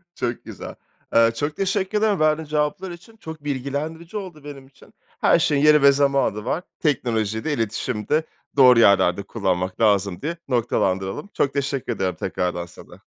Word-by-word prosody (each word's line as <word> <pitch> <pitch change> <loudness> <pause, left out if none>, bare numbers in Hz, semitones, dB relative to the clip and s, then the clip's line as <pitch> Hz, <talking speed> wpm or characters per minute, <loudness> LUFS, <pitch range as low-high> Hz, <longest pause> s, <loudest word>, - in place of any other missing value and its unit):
Çok 120 -1 -3
güzel. - - -9 0.4
Eee, 115 0 +5
çok 145 +4 -3
teşekkür 195 +1 0
ederim 210 -5 +1
verdiğin 155 0 +1
cevaplar 150 +5 -1
için. 185 +6 -12
Çok 160 -7 -10
bilgilendirici 145 +6 -4
oldu 180 -8 -7
benim 140 -2 -10
için. 135 - -21 0.3
Her - - +4
şeyin 145 -1 +2
yeri 150 -1 +6
ve 140 - +7
zamanı 140 -7 +1
var. 160 +8 -2 0.2
Teknolojiyi 110 -7 -1
de, 160 - -1
iletişimi 110 -2 -3
de 155 +2 +2 0.3
doğru 125 -3 +7
yerlerde 100 -3 +4
kullanmak 95 -4 -2
lazım 100 -3 +2
diye 165 +3 -3
noktalandıralım. 95 - -1
Çok 140 - 0
teşekkür 140 -3 -2
ederim, 95 -4 -2
tekrardan 90 +1 -3
sana. - - -15
140 Hz, 160 wpm, -22 LUFS, 110-155 Hz, 0.4 s, ve